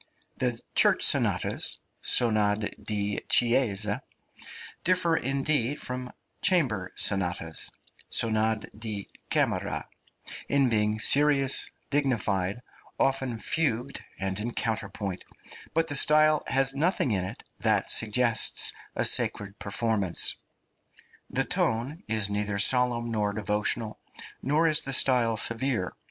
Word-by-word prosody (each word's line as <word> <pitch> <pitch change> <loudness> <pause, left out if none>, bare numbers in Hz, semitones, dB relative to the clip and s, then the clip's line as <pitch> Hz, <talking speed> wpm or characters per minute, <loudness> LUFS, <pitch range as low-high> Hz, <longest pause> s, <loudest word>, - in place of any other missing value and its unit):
The 120 -2 -2
church - - +3
sonatas - - +1 0.2
(sonad 105 -3 +1
di 105 -1 -2
chiesa) 115 -4 +2 0.8
differ, 175 -2 +2
indeed, 140 0 -1
from 125 0 -5 0.3
chamber 110 - +1
sonatas 85 -4 0 0.4
(sonad 110 -1 +1
di 105 -3 -2 0.2
camera) - - -1 0.6
in 140 -2 +2
being 105 -1 0
serious, 140 +1 +2 0.2
dignified, 110 -8 -1 0.4
often 135 -3 0
fugued 135 +1 -2 0.2
and 95 0 0
in 115 +3 -4
counterpoint, 105 -4 -3 0.5
but 165 0 +2
the 145 -3 -1
style 155 +1 +5
has 135 0 +2
nothing 145 - +1
in 95 -3 0
it 90 - -8 0.2
that - - +1
suggests 115 +1 +3 0.2
a - - 0
sacred 100 0 +1
performance. 100 -3 0 0.9
The - - -1
tone 125 +9 -1
is 110 -2 +1
neither 105 0 -2
solemn 120 +2 +3
nor 105 -2 -1
devotional, 105 +1 0 0.4
nor 155 +4 +1
is 155 -2 +4
the 135 - -3
style 125 -4 +2
severe. 115 - -1
115 Hz, 110 wpm, -27 LUFS, 105-135 Hz, 0.9 s, style